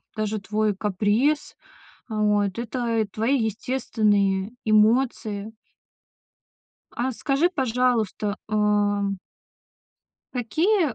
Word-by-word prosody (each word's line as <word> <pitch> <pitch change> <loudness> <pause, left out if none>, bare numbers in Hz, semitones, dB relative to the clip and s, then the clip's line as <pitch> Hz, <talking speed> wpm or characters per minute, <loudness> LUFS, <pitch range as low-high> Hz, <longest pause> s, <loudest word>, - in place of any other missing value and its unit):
даже 215 0 -2
твой 210 +1 0
каприз. 210 +9 0 0.5
Вот, 210 -2 +1
это 235 -1 -1
и 215 - 0
твои 225 +7 0
естественные 210 -3 0
эмоции. 215 -1 +2 1.4
А 255 +2 -2
скажи, 275 +7 +1
пожалуйста, 240 - 0
ам 205 -2 +1 1.2
какие, 310 - +1
215 Hz, 75 wpm, -24 LUFS, 205-250 Hz, 1.4 s, эмоции